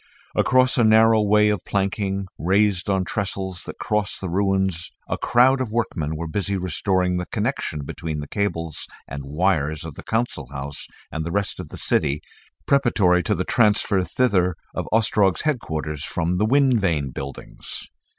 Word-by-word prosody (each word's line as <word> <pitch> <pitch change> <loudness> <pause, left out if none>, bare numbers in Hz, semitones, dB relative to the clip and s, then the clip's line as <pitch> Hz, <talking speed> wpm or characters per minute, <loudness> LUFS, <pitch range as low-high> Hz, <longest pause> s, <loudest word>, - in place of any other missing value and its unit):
Across 130 +1 +3
a - - +5
narrow 110 0 +6
way 105 0 +4
of 105 -4 -1
planking 100 0 -1
raised 95 +2 +2
on 95 -2 +1
trestles 95 -3 -3
that - - -7
crossed 105 -2 -1
the 95 - -4
ruins 95 -2 0 0.2
a - - -1
crowd 130 +2 +4
of 125 - -2
workmen 85 -9 -2
were 85 +2 -4
busy 100 +3 -1
restoring 90 0 0
the 90 - -3
connection 105 - -2
between 80 +1 -4
the 75 - -6
cables 85 -6 -2 0.2
and 70 - -6
wires 75 0 0
of 80 - -6
the - - -9
Council 110 - -2
House 70 0 -4 0.2
and 80 - -3
the 85 - -4
rest 100 +2 -1
of - - -7
the - - -8
city, 75 -1 +1 0.5
preparatory 110 -10 +3
to - - 0
the - - -1
transfer 105 -3 +3
thither 90 -2 +1 0.2
of - - -4
Ostrog's 105 -4 +3
headquarters 80 - -2
from 90 +1 -1
the 105 - +2
Wind 130 -1 +4
Vane 75 -8 0
buildings. 70 +1 -7
95 Hz, 165 wpm, -23 LUFS, 80-105 Hz, 0.5 s, narrow